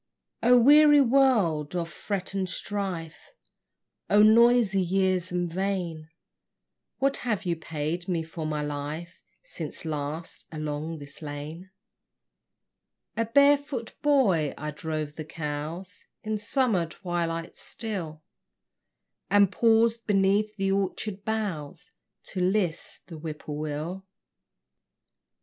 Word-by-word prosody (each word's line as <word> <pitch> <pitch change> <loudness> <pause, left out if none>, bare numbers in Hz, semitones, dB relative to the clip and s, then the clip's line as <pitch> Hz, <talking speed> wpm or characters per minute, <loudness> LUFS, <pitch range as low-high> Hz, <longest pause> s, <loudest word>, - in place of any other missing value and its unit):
O 245 +1 +6
weary 295 +4 +7
world 230 - +3
of 170 -1 -1
fret 190 +4 -4
and 190 -2 -1
strife, 185 -4 -5 0.8
O 210 +1 +6
noisy 225 -2 +5
years 185 0 +1
and 175 -1 -2
vain, 180 -5 -2 0.9
What 275 +1 +1
have 215 -5 -2
you 170 -1 +1
paid 160 +2 -4
me 170 -3 0
for 160 0 -5
my 150 -1 -2
life 150 +4 -5 0.2
Since - - -6
last, 155 +1 -5
along 155 +1 -4
this 145 +1 -11
lane, 155 +5 -7 1.5
A 230 - 0
barefoot 280 -1 +3
boy, 200 - +3
I 150 0 -4
drove 155 0 -4
the 155 - -4
cows 160 +4 -6 0.2
In 215 -1 -2
summer 210 -5 +1
twilights 165 -1 -4
still, 170 -9 -5 1.1
And 200 -2 +5
paused 230 +1 +3
beneath 205 +1 +2
the 195 -1 0
orchard 195 +1 -2
boughs 200 -10 -4 0.4
To 185 - -3
list 185 -3 -1
the 165 - -9
whippoorwill? 155 +3 -5
180 Hz, 110 wpm, -27 LUFS, 155-215 Hz, 1.5 s, weary